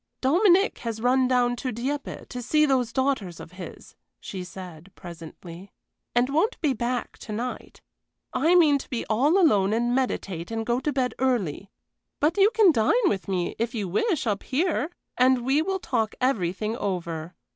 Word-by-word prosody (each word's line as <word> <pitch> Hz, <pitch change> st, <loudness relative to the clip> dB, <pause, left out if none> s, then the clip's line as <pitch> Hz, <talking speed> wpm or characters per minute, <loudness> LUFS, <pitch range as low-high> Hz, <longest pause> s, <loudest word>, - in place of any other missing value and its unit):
"Dominic 365 Hz, -, +3 dB
has 230 Hz, -2 st, -4 dB
run 255 Hz, +2 st, +3 dB
down 245 Hz, -1 st, +2 dB
to 255 Hz, +1 st, -3 dB
Dieppe 270 Hz, +6 st, -4 dB
to 250 Hz, -, -6 dB
see 305 Hz, +5 st, +3 dB
those 255 Hz, -5 st, +1 dB
daughters 260 Hz, -, -1 dB
of -, -, -10 dB
his," 185 Hz, -1 st, -10 dB, 0.2 s
she 185 Hz, -2 st, -6 dB
said, 180 Hz, -1 st, -10 dB
presently, 170 Hz, +2 st, -11 dB, 0.4 s
"and 240 Hz, +1 st, +3 dB
won't 330 Hz, -, +1 dB
be 295 Hz, -5 st, +1 dB
back 240 Hz, 0 st, -3 dB
to -, -, -9 dB
night. 240 Hz, +4 st, -5 dB, 0.5 s
I 325 Hz, +6 st, +3 dB
meant 300 Hz, -6 st, +5 dB
to -, -, -14 dB
be 245 Hz, -, -3 dB
all 280 Hz, -, +3 dB
alone 210 Hz, -, +4 dB
and 240 Hz, +2 st, +1 dB
meditate 195 Hz, -9 st, -2 dB
and 225 Hz, 0 st, -3 dB
go 240 Hz, +2 st, +1 dB
to 295 Hz, -, -1 dB
bed 255 Hz, -2 st, 0 dB
early; 205 Hz, -, -1 dB, 0.5 s
but 310 Hz, +3 st, +2 dB
you 400 Hz, +1 st, +5 dB
can 435 Hz, -5 st, +5 dB
dine 360 Hz, -, +3 dB
with 195 Hz, -, -3 dB
me, 180 Hz, -3 st, -2 dB
if 235 Hz, +2 st, -2 dB
you 205 Hz, -4 st, -2 dB
wish, 290 Hz, -, 0 dB
up 205 Hz, -3 st, -1 dB
here, 315 Hz, +2 st, 0 dB, 0.3 s
and 255 Hz, -1 st, +4 dB
we 275 Hz, +4 st, +3 dB
will 380 Hz, +3 st, -1 dB
talk 230 Hz, -, -1 dB
everything 215 Hz, -3 st, 0 dB
over. 170 Hz, -5 st, -4 dB
245 Hz, 175 wpm, -25 LUFS, 200-285 Hz, 0.5 s, meant